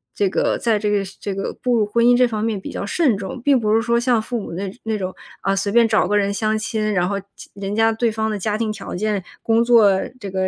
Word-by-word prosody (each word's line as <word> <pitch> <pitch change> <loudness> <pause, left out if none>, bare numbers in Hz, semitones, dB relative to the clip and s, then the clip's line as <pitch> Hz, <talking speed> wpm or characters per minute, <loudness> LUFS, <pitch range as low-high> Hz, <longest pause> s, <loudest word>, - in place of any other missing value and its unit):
这 200 - +1
个 - - 0
在 225 -3 +1
这 210 0 -1
个 205 -1 +1 0.2
这 200 -2 -4
个 195 - -3
步 250 -1 +1
入 215 - +2
婚 235 +3 +1
姻 245 0 +6
这 250 - +5
方 220 -3 -3
面 220 -3 -1
比 - - -8
较 - - -4
慎 255 - +1
重， 195 +5 -6
并 275 0 +3
不 215 -1 +1
是 225 - +3
说 235 0 +1
像 240 -1 +2
父 240 +2 -3
母 195 - -7
那 190 +2 -4
那 220 -1 -1
种， 185 -2 -4 0.3
啊， 195 - +1
随 195 +1 -1
便 235 -1 +6
找 220 -1 +2
个 210 - +1
人 200 -1 +1
相 215 +1 0
亲， 215 -1 -2
然 180 -2 +1
后， 200 -1 -1 0.2
亲 - - -13
人 200 0 -4
家 225 +1 +3
对 230 +1 0
方 220 0 -2
的 210 - -3
家 210 +2 -1
庭 220 -1 -1
条 215 - -7
件、 205 +1 -1 0.2
工 225 0 +2
作， 220 -5 +5 0.2
这 200 -6 -7
个 190 0 0
215 Hz, 300 characters per minute, -20 LUFS, 200-230 Hz, 0.3 s, 姻